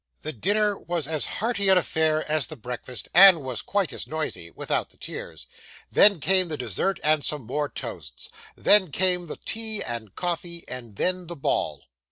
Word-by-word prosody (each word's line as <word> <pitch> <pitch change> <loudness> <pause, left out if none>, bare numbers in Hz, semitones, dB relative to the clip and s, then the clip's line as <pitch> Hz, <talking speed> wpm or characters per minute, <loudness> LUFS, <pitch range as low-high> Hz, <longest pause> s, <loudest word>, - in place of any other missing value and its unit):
The 155 - -4
dinner 205 - +1
was 170 -4 -3
as 155 0 -1
hearty 205 -3 -1
an 190 - +6
affair 160 -2 +1
as 155 -1 +1
the 155 - -8
breakfast, 125 0 -6
and 180 -3 +8
was 130 -4 -3
quite 195 -9 -1
as - - -3
noisy, 155 - -4
without - - -2
the - - -18
tears. - - -7 0.5
Then 200 -4 +6
came 185 +3 +3
the 155 -2 -4
dessert 125 - -2
and 155 -1 +2
some 150 -3 0
more 145 +5 -2
toasts. 85 - -8 0.3
Then 205 -4 +5
came 180 +2 +1
the - - -5
tea 220 -1 -2
and 115 -4 -5
coffee; 170 -1 -3
and 120 -4 -7
then, 180 - -1
the 170 - -6
ball. 135 - -1
160 Hz, 180 wpm, -25 LUFS, 130-185 Hz, 0.5 s, and